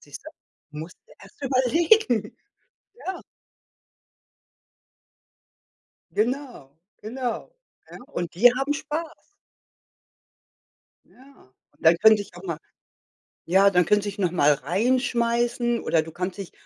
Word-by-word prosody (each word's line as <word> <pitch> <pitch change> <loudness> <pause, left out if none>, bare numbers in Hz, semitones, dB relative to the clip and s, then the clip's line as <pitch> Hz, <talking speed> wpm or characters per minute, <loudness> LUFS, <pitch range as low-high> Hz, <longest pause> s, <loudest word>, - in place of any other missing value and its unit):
Siehst - - -12
du. - - -9 0.5
Musst 160 +3 -8
du - - -20
erst - - -17
überlegen. 260 - +2 0.7
Ja. 380 - -4 2.9
Genau, 245 - -2 0.3
genau. 240 - -4 0.4
Ja, - - -10 0.2
und 175 -1 -4
die 240 +7 +6
haben 270 +3 -1
Spaß. 315 +2 -6 1.8
Ja, 265 - -21 0.2
und 145 - -28
dann 165 +1 +6
könnte 215 0 +6
ich 185 - -17
auch 180 - -11
mal 165 -4 -4 0.9
ja, 195 +3 +5
dann 180 -2 +3
können 205 +4 +2
sich 205 0 -5
nochmal 170 -6 +3
reinschmeißen 235 - 0
oder 160 - +1
du 160 0 -10
kannst 180 +3 -4
dich 195 -3 -7
220 Hz, 110 wpm, -24 LUFS, 180-255 Hz, 2.9 s, die